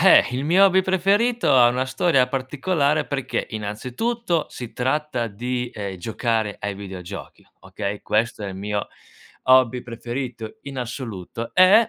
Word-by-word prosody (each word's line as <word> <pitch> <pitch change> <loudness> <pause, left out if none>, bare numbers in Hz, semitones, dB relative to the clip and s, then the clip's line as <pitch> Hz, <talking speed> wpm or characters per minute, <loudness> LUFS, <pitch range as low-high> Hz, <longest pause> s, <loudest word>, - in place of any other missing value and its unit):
eh! 190 - +7
Il 130 +2 -1
mio 180 +6 +5
hobby 190 -1 +5
preferito, 200 - +2
ha 120 -1 +7
una 125 +2 0
storia 130 0 +3
particolare, 145 +3 0
perché 135 -3 -2
innanzitutto, 130 - -2
si 120 -2 -8
tratta 130 -2 -1
di, 125 +3 -3
ehm, 100 -3 -5
giocare 110 +2 -1
ai 100 0 -3
videogiochi, 95 -1 -8
okay, 100 -1 -5
questo 110 0 0
è 100 - -3
il 95 - -7
mio 105 +1 -3 0.6
hobby 130 -1 +5
preferito, 120 -1 -5
in 140 -1 -8
assoluto. 115 -4 -5
Ed, 200 +5 +7
125 Hz, 140 wpm, -23 LUFS, 110-150 Hz, 0.6 s, eh